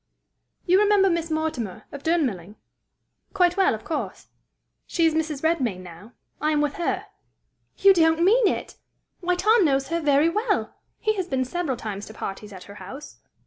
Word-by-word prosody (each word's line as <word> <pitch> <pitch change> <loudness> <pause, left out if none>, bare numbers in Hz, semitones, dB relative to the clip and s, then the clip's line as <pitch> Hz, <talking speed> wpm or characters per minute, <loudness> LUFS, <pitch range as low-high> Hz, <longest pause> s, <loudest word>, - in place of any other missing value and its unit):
"You 370 +2 +4
remember 405 -2 +4
Miss 335 -1 -1
Mortimer, 310 - -3
of 285 - -8
Durnmelling?" 240 - -1 0.8
"Quite 355 -2 +3
well, 385 - +3
of 220 - -11
course." 315 - -5 0.6
"She 335 - +1
is 325 - +3
Mrs. 315 -2 -2
Redmain 260 - 0
now: 185 +6 -13 0.3
I 305 - +1
am 305 -1 +2
with 295 -1 0
her." 345 - -2 0.7
"You 395 0 +6
don't 325 -1 +3
mean 440 +4 +5
it! - - -3 0.4
Why, 360 0 0
Tom 430 +4 +4
knows 270 -3 +1
her 335 0 -1
very 290 +1 +3
well! 420 +5 -1 0.3
He 435 - +1
has 370 -2 -2
been 260 -5 -1
several 285 -2 -2
times 205 -3 -6
to 220 - -12
parties 205 +1 -6
at 185 -2 -10
her 200 - -12
house." 265 +11 -10
315 Hz, 175 wpm, -24 LUFS, 245-355 Hz, 0.8 s, You